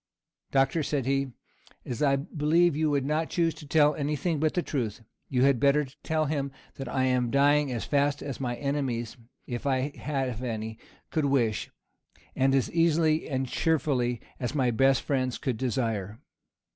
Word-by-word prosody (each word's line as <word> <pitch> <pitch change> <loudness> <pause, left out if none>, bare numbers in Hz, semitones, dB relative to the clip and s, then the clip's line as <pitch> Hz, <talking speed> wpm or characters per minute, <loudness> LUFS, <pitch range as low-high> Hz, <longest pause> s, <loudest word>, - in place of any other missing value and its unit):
"Doctor," 135 +4 +2
said 145 -3 -1
he, 135 +1 +1 0.6
"as 125 +3 -4
I 140 -2 +4
believe 155 +3 +2
you 155 0 +1
would 140 -2 +1
not 155 +3 0
choose 165 -2 +1
to 150 - -12
tell 150 0 +4
any 150 +1 -1
thing 160 +2 -1
but 155 0 +1
the 175 - +1
truth, 120 -5 -3 0.3
you 125 -1 +2
had 135 -3 +4
better 145 +2 +3 0.2
tell 155 -1 0
him 140 -2 -2 0.3
that 135 - -5
I 130 0 0
am 125 -2 +2
dying 145 +1 +3
as 120 -2 -3
fast 145 0 +1
as 140 -3 -5
my 125 -2 -2
enemies, 130 -5 -2 0.3
if 120 +2 -4
I 135 +1 0
have 130 -5 -3
any, 110 -2 -4 0.3
could 155 -2 +1
wish, 120 -6 +1 0.7
and 135 +1 +3
as 135 - +1
easily 165 -2 +2
and 130 -2 -1
cheerfully 130 -5 0 0.2
as 125 +3 -3
my 130 -4 +2
best 135 +3 +3
friends 130 -3 0
could 130 -5 -2
desire." 115 -5 -2
140 Hz, 170 wpm, -28 LUFS, 125-150 Hz, 0.7 s, I